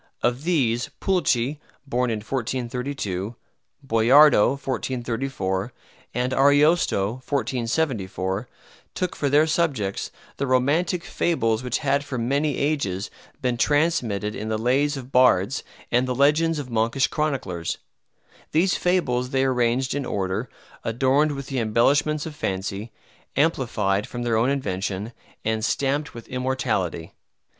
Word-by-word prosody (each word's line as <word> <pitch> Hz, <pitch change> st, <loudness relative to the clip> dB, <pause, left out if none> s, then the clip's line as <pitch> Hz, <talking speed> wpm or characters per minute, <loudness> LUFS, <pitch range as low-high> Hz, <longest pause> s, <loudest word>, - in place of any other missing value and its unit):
Of 125 Hz, +5 st, 0 dB
these, 125 Hz, -9 st, +1 dB
Pulci 150 Hz, -7 st, +1 dB, 0.3 s
(born 125 Hz, -2 st, 0 dB
in 110 Hz, -2 st, -2 dB
1432), 120 Hz, -4 st, -3 dB, 0.5 s
Boiardo 125 Hz, +1 st, +6 dB
(1434), 125 Hz, -6 st, -2 dB, 0.4 s
and 125 Hz, +1 st, 0 dB
Ariosto 140 Hz, -, +3 dB
(1474) 115 Hz, -6 st, -1 dB, 0.5 s
took 180 Hz, -1 st, -2 dB
for 140 Hz, -, 0 dB
their 150 Hz, +3 st, +5 dB
subjects 145 Hz, -, -1 dB, 0.3 s
the 140 Hz, -, -1 dB
romantic 150 Hz, +8 st, +2 dB
fables 115 Hz, -10 st, 0 dB
which 125 Hz, -1 st, -1 dB
had 140 Hz, -1 st, +1 dB
for 140 Hz, -3 st, -5 dB
many 140 Hz, +5 st, 0 dB
ages 125 Hz, -10 st, -1 dB, 0.3 s
been 125 Hz, -1 st, +1 dB
transmitted 125 Hz, -, +1 dB
in 110 Hz, +1 st, -5 dB
the 110 Hz, -, 0 dB
lays 135 Hz, +6 st, +1 dB
of 130 Hz, 0 st, -9 dB
bards 125 Hz, -2 st, +3 dB, 0.3 s
and 125 Hz, +2 st, +2 dB
the 125 Hz, -, -1 dB
legends 150 Hz, +4 st, +3 dB
of 135 Hz, -4 st, -6 dB
monkish 115 Hz, +4 st, +2 dB
chroniclers. 130 Hz, -, -2 dB, 0.8 s
These 175 Hz, +5 st, +3 dB
fables 125 Hz, -9 st, +1 dB
they 135 Hz, 0 st, +1 dB
arranged 125 Hz, 0 st, +1 dB
in 140 Hz, -2 st, -2 dB
order, 100 Hz, +4 st, -2 dB, 0.3 s
adorned 135 Hz, +6 st, +2 dB
with 140 Hz, -1 st, -6 dB
the 135 Hz, -1 st, -2 dB
embellishments 140 Hz, +7 st, +2 dB
of 160 Hz, -2 st, -7 dB
fancy, 100 Hz, -4 st, -3 dB, 0.4 s
amplified 115 Hz, -9 st, +1 dB
from 120 Hz, 0 st, -5 dB
their 120 Hz, -2 st, +1 dB
own 115 Hz, +4 st, +3 dB
invention, 100 Hz, -4 st, -2 dB, 0.3 s
and 110 Hz, 0 st, 0 dB
stamped 140 Hz, +4 st, 0 dB
with 115 Hz, -, -9 dB
immortality. 125 Hz, -, -2 dB
125 Hz, 125 wpm, -24 LUFS, 110-145 Hz, 0.8 s, Boiardo